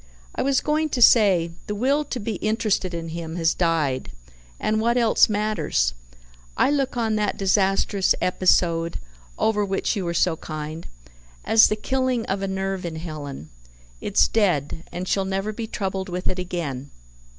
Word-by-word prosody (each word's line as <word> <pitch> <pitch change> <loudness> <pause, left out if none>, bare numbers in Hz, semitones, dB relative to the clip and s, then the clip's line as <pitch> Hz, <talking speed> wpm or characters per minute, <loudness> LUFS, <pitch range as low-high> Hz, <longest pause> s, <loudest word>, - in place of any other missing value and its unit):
I - - -2
was 275 -1 +2
going 310 +1 0
to - - -1
say, 195 -8 +5 0.2
the 210 - -3
will 275 +7 +1
to 260 - -4
be 210 -1 -3
interested 215 -3 0
in 165 -1 -5
him 165 0 -6
has 165 -1 +2
died, 160 -7 0 0.5
and 215 0 0
what 235 +2 +2
else 230 -2 +4
matters? 195 - 0 0.6
I - - +3
look 270 -3 0
on 220 -2 0
that 210 -1 -1
disastrous 195 0 +2
episode 170 -2 +2 0.4
(over 210 -2 +1
which 195 +3 -1
you 200 - -2
were 170 -1 -3
so 170 -1 +2
kind) 155 +1 -6 0.6
as 225 0 +6
the 215 - 0
killing 255 +1 -1
of 195 +1 -2
a 195 - -1
nerve 190 0 -3
in 170 -2 -4
Helen. 150 - -7 0.5
It's - - +3
dead, 165 -8 0
and 180 +1 -5
she'll 195 - +1
never 195 +2 -2
be 225 +1 -5
troubled 190 -3 -3
with 180 +1 -4
it 185 - -1
again. 155 -7 -4
190 Hz, 165 wpm, -23 LUFS, 165-220 Hz, 0.6 s, as